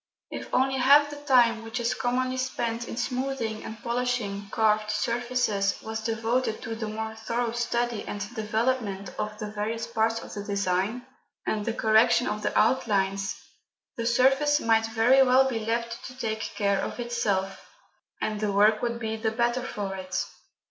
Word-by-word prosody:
If - - -7
only 265 +1 +2
half 290 +3 +6
the - - -6
time 245 -6 +4
which 225 +2 -4
is 235 0 0
commonly 255 +1 -1
spent 235 -2 -2
in - - -6
smoothing 250 -3 -2
and 220 - -7
polishing 235 -5 -2
carved 215 0 +2
surfaces 230 -2 0
was 220 0 -4
devoted 225 +1 0
to 225 - -4
the 225 -1 -4
more 220 +1 -4
thorough 230 +1 -2
study 240 -1 -1
and 205 - -4
development 220 -2 -1
of 210 0 -3
the 215 - -5
various 220 +2 -3
parts 225 0 0
of - - -10
the 205 - -5
design, 200 +4 -1 0.4
and 210 -1 -1
the 230 - -1
correction 225 +2 +4
of 210 - -2
the - - -1
outlines, 200 -4 +1 0.6
the 230 -1 -2
surface 270 +5 +4
might 225 -2 +2
very 230 +4 +4
well 260 0 +5
be 240 -4 -1
left 235 +1 -2
to 255 0 -9
take 220 -3 -2
care 200 -2 +1
of - - -5
itself, 205 -5 -1 0.6
and 215 -1 -2
the 210 -1 0
work 210 +2 +4
would 235 -1 -1
be 220 -1 -2
the 220 0 0
better 240 +2 0
for 205 -6 -4
it. 185 -1 -3
225 Hz, 170 wpm, -27 LUFS, 215-245 Hz, 0.6 s, half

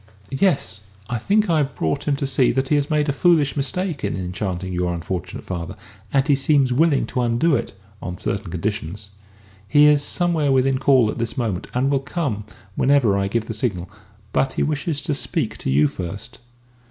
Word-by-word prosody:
"Yes. 135 - +1 0.3
I 120 - -1
think 210 - +2
I 165 -3 +2
have 135 -3 -1
brought 80 - -2
him 145 - +2
to 140 - -3
see 130 -2 +3
that 130 +1 -1
he 150 - +3
has 145 0 0
made 150 -1 +1
a 140 - +1
foolish 155 -2 +3
mistake 170 +3 -2
in - - -1
enchanting 95 0 -4
your 90 0 -1
unfortunate 85 0 -5
father, 85 -3 -5 0.4
and 135 +1 +2
he 145 - +4
seems 135 -1 +3
willing 150 +1 +3
to 125 - -2
undo 120 +7 +2
it - - -3 0.3
on 90 0 -5
certain 100 0 -3
conditions. 100 +2 -4 0.6
He 145 +7 +5
is 150 -1 +5
somewhere 165 -3 +1
within 130 0 +2
call 130 -5 +4
at - - -7
this 115 -1 -3
moment, 110 -8 -2
and 135 +3 +1
will 140 - +2
come 130 - -3
in 100 - -18 0.2
whenever 130 -7 +3
I 100 0 0
give 110 +2 -1
the - - -5
signal. 95 -6 -3 0.4
But 135 -1 +1
he - - 0
wishes 150 0 -2
to 155 - -1
speak 140 - -2
to - - -3
you 75 +3 +4
first." 100 +9 -7
130 Hz, 200 wpm, -22 LUFS, 100-145 Hz, 0.6 s, He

